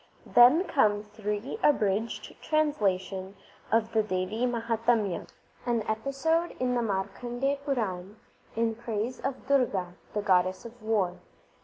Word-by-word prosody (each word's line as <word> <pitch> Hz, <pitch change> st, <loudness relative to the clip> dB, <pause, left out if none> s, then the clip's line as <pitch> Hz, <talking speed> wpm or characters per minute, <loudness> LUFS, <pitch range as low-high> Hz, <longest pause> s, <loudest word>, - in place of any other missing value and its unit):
Then 250 Hz, +9 st, +7 dB
come 210 Hz, -, +2 dB
three 210 Hz, -, -4 dB
abridged 220 Hz, -5 st, +1 dB
translations 200 Hz, -11 st, 0 dB, 0.4 s
of 225 Hz, 0 st, +2 dB
the 220 Hz, -, +3 dB
Devi 210 Hz, +4 st, -1 dB
Mahatamya, 230 Hz, -4 st, 0 dB, 0.4 s
an 235 Hz, -2 st, +1 dB
episode 275 Hz, +9 st, 0 dB
in 250 Hz, -1 st, +1 dB
the 245 Hz, -, +1 dB
Markandeya 240 Hz, +6 st, -1 dB
Puran, 210 Hz, -8 st, -2 dB, 0.4 s
in 225 Hz, 0 st, +1 dB
praise 230 Hz, +2 st, -3 dB
of 270 Hz, -, -4 dB
Durga 210 Hz, -10 st, +1 dB, 0.2 s
the 210 Hz, -, 0 dB
goddess 185 Hz, 0 st, +2 dB
of 235 Hz, 0 st, -11 dB
war. 205 Hz, -5 st, 0 dB
225 Hz, 120 wpm, -28 LUFS, 200-250 Hz, 0.4 s, Then